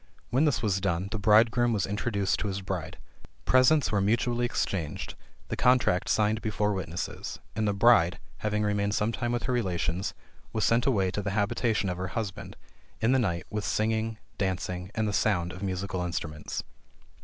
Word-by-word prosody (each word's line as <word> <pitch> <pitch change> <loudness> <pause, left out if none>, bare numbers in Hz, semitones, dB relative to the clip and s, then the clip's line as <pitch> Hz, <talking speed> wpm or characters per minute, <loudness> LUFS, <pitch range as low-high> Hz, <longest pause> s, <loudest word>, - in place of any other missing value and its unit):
When 135 +6 +3
this 135 -8 +1
was 95 -3 +1
done, 90 +3 -1
the 110 - -2
bridegroom 115 +3 +4
was 100 -4 +1
introduced 100 -1 -1
to - - -2
his 100 0 -3
bride. 95 -3 -4 0.5
Presents 130 +4 +4
were 100 -2 +2
mutually 120 +4 +1
exchanged, 85 -10 -3 0.4
the - - -1
contract 125 -7 +3
signed 110 +1 +2
before 105 -1 0
witnesses, 90 -2 -4 0.2
and 110 0 0
the 100 - +2
bride, 100 -6 +5 0.2
having 105 0 0
remained 105 0 0
sometime 115 +3 0
with 120 0 -1
her 125 - 0
relations, 95 -4 -1 0.4
was 110 - +1
sent 115 +3 +2
away 95 -8 +2
to 105 - -2
the 100 - -2
habitation 105 0 +1
of 90 -1 -2
her 95 +1 -3
husband, 105 -2 -4 0.4
in 110 +3 +2
the 130 - +4
night, 85 -8 -1
with 105 -1 -2
singing, 110 +1 0 0.2
dancing, 90 -1 -2
and 110 -1 0
the 105 - -2
sound 90 -5 +1
of 95 - -9
musical 95 -1 -2
instruments." 80 -4 -4
105 Hz, 175 wpm, -28 LUFS, 95-115 Hz, 0.5 s, bride